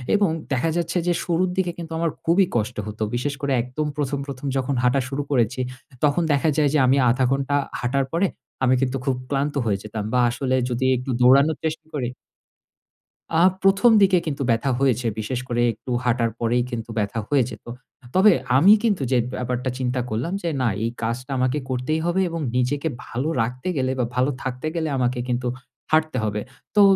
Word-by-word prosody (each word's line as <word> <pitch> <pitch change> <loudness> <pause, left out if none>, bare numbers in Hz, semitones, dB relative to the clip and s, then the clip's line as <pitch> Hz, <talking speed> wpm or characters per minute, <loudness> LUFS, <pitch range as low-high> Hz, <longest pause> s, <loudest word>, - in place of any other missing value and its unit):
এবং 200 -4 +3 0.2
দেখা 135 +5 +1
যাচ্ছে 175 +1 -1
যে 175 - +3
শুরুর 180 +1 +1
দিকে 180 -2 +1
কিন্তু 165 -1 -7
আমার 165 -1 +1 0.2
খুবই 180 +4 +4
কষ্ট 115 +1 0
হত। 105 +1 -7 0.2
বিশেষ 145 +4 -1
করে 140 -1 -1
একদম 130 +5 -3
১ম, 140 -1 -1
১ম 140 0 -7
যখন 135 +1 -1
হাঁটা 130 +2 +3
শুরু 140 +1 -2
করেছি, 125 -1 +1 0.4
তখন 150 +4 +3
দেখা 140 +3 +2
যায় 145 -2 +4
যে 150 - +4
আমি 135 +2 +4
আধা 130 +2 +2
ঘন্টা 140 +1 0 0.2
হাঁটার 135 +2 0
পরে, 180 +4 +2 0.4
আমি 130 0 +4
কিন্তু 135 0 0
খুব 135 -2 +1
ক্লান্ত 145 +1 -1
হয়ে 100 -3 +1
যেতাম 105 0 -5
বা 125 - +3
আসলে 130 +2 -1
যদি 125 +2 -1
একটু 130 +2 -6
দৌড়ানোর 140 +5 +5
চেষ্টা 160 0 -3
করি 125 -5 -2 1.3
আ - - +4 0.2
১ম 195 +5 +5
দিকে 190 -2 +5
কিন্তু 145 -3 -3
ব্যাথা 115 +4 +2
হয়েছে। 125 -3 +1
বিশেষ 120 +3 -2
করে 120 0 0
একটু 120 +4 -9
হাঁটার 120 -2 +1
পরেই 120 +1 +1
কিন্তু 115 -1 -5
ব্যথা 105 +2 -1
হয়ে 140 -3 +4
যেত। - - -11 0.5
তবে 200 +2 +7 0.3
আমি 195 +9 +7
কিন্তু 205 -10 +1
যে 125 - +4 0.2
ব্যাপারটা 125 +1 -2
চিন্তা 125 0 -1
করলাম 120 - -2
যে 170 - 0
না, 125 - +2 0.2
এই 115 - +1
কাজটা 125 +4 -3
আমাকে 130 +3 +1
করতেই 130 +5 -1
হবে 180 +2 +1
এবং 165 -1 -4
নিজেকে 140 +5 0 0.2
ভালো 130 +6 -3
রাখতে 125 +8 -3
গেলে 130 0 +1
বা 120 - +2
ভালো 130 +3 +2
থাকতে 130 +3 -3
গেলে 160 -2 -1
আমাকে 125 0 0
কিন্তু 125 0 -1 0.4
হাঁটতে 155 -3 +2
হবে। 105 0 -1 0.3
তো 205 - +6
130 Hz, 190 wpm, -23 LUFS, 125-155 Hz, 1.3 s, তবে